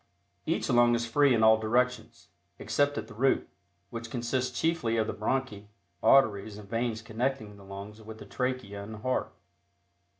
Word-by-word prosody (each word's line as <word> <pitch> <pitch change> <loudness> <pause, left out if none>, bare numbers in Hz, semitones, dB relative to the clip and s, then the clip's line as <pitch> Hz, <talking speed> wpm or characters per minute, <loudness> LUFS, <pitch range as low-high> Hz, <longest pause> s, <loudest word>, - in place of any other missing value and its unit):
Each - - 0
lung 120 -1 +4
is 115 0 -1
free 140 +4 +3
in 115 -3 +3
all 110 0 +6
directions, 120 +1 -1 0.3
except 145 +6 0
at - - -4
the 115 - -11
root, 130 +5 +1 0.4
which 115 0 -6
consists 125 +1 -2
chiefly 160 -9 +1
of 110 - +2
the - - -3
bronchi, 110 -2 -2 0.3
arteries 110 -4 +3
and 105 -1 -11
veins 115 0 -2
connecting 115 -1 -3
the 100 - -15
lungs 100 +2 -9
with 110 0 -10
the - - -11
trachea 125 -6 -3
and 110 +2 -8
heart. 130 0 -1
115 Hz, 165 wpm, -29 LUFS, 110-125 Hz, 0.4 s, all